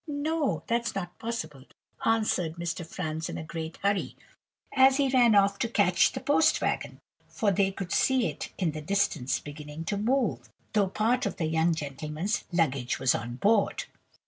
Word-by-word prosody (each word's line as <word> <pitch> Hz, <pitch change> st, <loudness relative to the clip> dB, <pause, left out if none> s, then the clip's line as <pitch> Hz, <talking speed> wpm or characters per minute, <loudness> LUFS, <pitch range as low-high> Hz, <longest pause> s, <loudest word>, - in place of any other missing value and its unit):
no, 300 Hz, 0 st, -1 dB
that's 235 Hz, -1 st, -1 dB
not 180 Hz, -3 st, -4 dB
possible,' 225 Hz, -, -5 dB, 0.4 s
answered 215 Hz, -7 st, +1 dB
Mr. 170 Hz, 0 st, -4 dB
Franz 160 Hz, -2 st, -4 dB
in -, -, -5 dB
a -, -, -5 dB
great 160 Hz, 0 st, -6 dB
hurry, 200 Hz, 0 st, 0 dB, 0.6 s
as 265 Hz, 0 st, +6 dB
he 280 Hz, -2 st, +2 dB
ran 245 Hz, -4 st, +5 dB
off 200 Hz, 0 st, +4 dB
to 235 Hz, -, 0 dB
catch 240 Hz, -, +3 dB
the -, -, -3 dB
post -, -, +3 dB
wagon; -, -, -2 dB, 0.3 s
for 210 Hz, -3 st, 0 dB
they 195 Hz, +1 st, +2 dB
could 190 Hz, -2 st, -6 dB
see 260 Hz, -3 st, +3 dB
it -, -, -4 dB
in 175 Hz, -4 st, 0 dB
the 155 Hz, 0 st, -6 dB
distance 155 Hz, -7 st, 0 dB
beginning 150 Hz, +2 st, -8 dB
to 200 Hz, +4 st, -1 dB
move, 210 Hz, -, 0 dB, 0.2 s
though 205 Hz, -3 st, +2 dB
part 225 Hz, +5 st, +1 dB
of -, -, -5 dB
the 165 Hz, -, -1 dB
young 160 Hz, +1 st, +2 dB
gentleman's 150 Hz, +6 st, -3 dB
luggage 140 Hz, -8 st, 0 dB
was 130 Hz, -1 st, +3 dB
on 120 Hz, +1 st, -4 dB
board. 205 Hz, -, +2 dB
185 Hz, 170 wpm, -28 LUFS, 155-225 Hz, 0.6 s, as